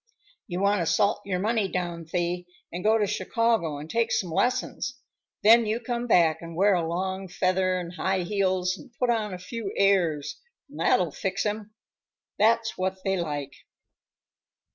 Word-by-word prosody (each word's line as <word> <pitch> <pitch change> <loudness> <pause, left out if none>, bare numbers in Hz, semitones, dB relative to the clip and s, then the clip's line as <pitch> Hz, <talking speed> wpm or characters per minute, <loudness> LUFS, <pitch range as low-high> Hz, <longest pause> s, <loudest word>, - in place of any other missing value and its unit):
"You 180 +1 -3
want 200 0 +3
to 165 - -1
salt 200 +6 +2
your 190 -2 -1
money 215 +1 +1
down, 175 -3 -4
Thee, 175 0 -1 0.2
and 175 +2 -5
go 220 +1 +4
to 210 - +2
Chicago 200 -5 0
and 150 +2 -8
take 230 +5 0
some 180 -4 0
lessons. 255 +5 -1 0.5
Then 225 +1 +7
you 220 +2 0
come 240 0 -3
back, 170 -7 +4
and 170 -1 -8
wear 200 +3 +4
a 170 -3 0
long 190 +3 -3
feather 185 0 +1
and 175 0 -6
high 190 0 0
heels 185 -1 0
and 260 - -14
put 250 -1 +2
on 215 -3 -1
a 185 - -5
few 200 +3 -5
airs, 175 -7 +2 0.3
and - - -12
that'll - - +2
fix - - -2
'em. 215 0 -3 0.6
That's 225 0 +2
what 190 0 -2
they 195 0 +1
like." 145 -6 -3
190 Hz, 170 wpm, -26 LUFS, 175-215 Hz, 0.6 s, Then